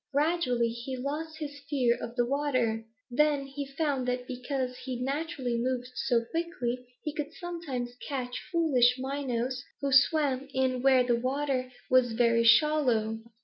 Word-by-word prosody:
Gradually 285 -5 +2
he 240 +3 -5
lost 305 +5 -4
his 290 -2 -6
fear 250 -5 +3
of 235 - -6
the 240 -1 +2
water. 255 -5 0 0.3
Then 290 +1 +2
he 275 +1 -6
found 275 -2 -1
that 250 0 -1
because 255 0 -3
he 255 -2 -5
naturally 270 -2 -2
moved 250 0 -2
so 240 -4 +1
quickly 255 -8 -2 0.2
he 300 - -3
could 300 0 -4
sometimes 310 -10 -5 0.2
catch 255 -3 -3
foolish 265 -8 +4
minnows 255 -2 -2 0.2
who 280 -1 -1
swam 275 -1 +3
in 260 -1 +1
where 260 -1 +5
the 240 -1 +2
water 260 0 -1 0.2
was 255 -2 +4
very 230 0 +3
shallow. 230 -4 +4
260 Hz, 145 wpm, -29 LUFS, 245-285 Hz, 0.3 s, where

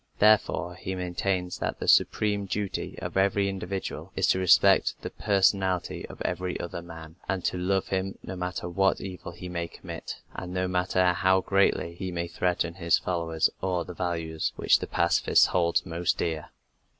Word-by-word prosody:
Therefore, 105 -4 +3
he 95 +1 -5
maintains 90 0 -2
that - - -3
the - - -4
supreme 105 -2 +3
duty 100 0 -3
of - - -5
every 100 +1 +3
individual 95 0 -4
is - - +2
to 95 - +3
respect 95 -1 +5
the - - -4
personality 95 -3 +1
of - - -12
every 90 0 -2
other 85 0 -5
man, 80 -1 -11
and 95 -1 -1
to - - 0
love 95 +1 0
him, 95 0 -2
no 95 - -6
matter 90 -1 -4
what 95 +2 +2
evil 90 -2 -7
he 90 +1 -9
may 85 -1 -3
commit, - - -8 0.2
and 90 0 -6
no 90 0 0
matter 90 0 +2
how 95 +1 +3
greatly 95 -3 +2
he 90 +2 -5
may 85 0 -2
threaten 85 -1 -1
his 85 -2 +2
fellows 85 -3 0
or 90 -2 -1
the 90 - -7
values 80 -3 -2
which - - +4
the - - -5
pacifist - - +3
holds 85 -2 +2
most 85 0 -1
dear. 80 -3 -2
90 Hz, 175 wpm, -27 LUFS, 85-95 Hz, 0.2 s, respect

